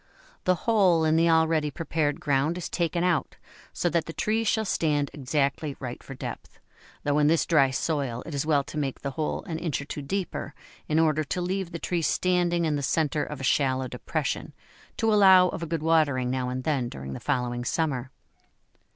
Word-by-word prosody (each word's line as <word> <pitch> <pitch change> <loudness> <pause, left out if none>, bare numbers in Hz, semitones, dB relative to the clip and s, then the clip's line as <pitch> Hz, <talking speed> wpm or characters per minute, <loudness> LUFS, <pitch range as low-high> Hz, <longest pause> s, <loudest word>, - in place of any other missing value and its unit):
The 185 - +4
hole 190 -8 +4
in 155 0 +3
the 165 +1 +4
already 160 -2 +3
prepared 150 -1 -1
ground 145 +4 +1
is 180 - -5
taken 170 0 -1
out 175 -7 0 0.3
so - - -1
that 165 0 0
the 165 - -7
tree 220 +5 0
shall 220 0 +1
stand 150 -6 0
exactly 140 0 -1
right 125 -2 -6
for 135 - -9
depth, - - -8 0.4
though 145 0 +1
in 150 - +4
this 165 +1 +3
dry 145 -5 +4
soil 130 -3 -2
it 165 - -7
is 140 - -1
well 150 -2 +2
to 150 +2 -6
make 135 -3 -3
the 140 - -3
hole 150 +3 -2
an 160 -2 -5
inch 165 -4 -2
or 140 - -6
two 145 - -6
deeper, 165 -1 -4 0.3
in 155 - +1
order 155 -1 +3
to 180 - -3
leave 185 0 -2
the 170 - -4
tree 170 +1 -2
standing 175 0 +1
in 150 -2 0
the - - -2
centre 150 +1 0
of 150 -3 -6
a - - -6
shallow 130 -1 +1
depression, - - -3 0.4
to 225 -1 +2
allow 190 -3 +7
of - - -5
a 170 - -3
good 160 -1 -2
watering 145 -6 +2
now 130 -1 -1
and 130 0 -4
then 135 -5 0
during 65 - -7
the - - -6
following 125 -3 -1
summer. 130 -3 -1
155 Hz, 205 wpm, -26 LUFS, 140-170 Hz, 0.4 s, allow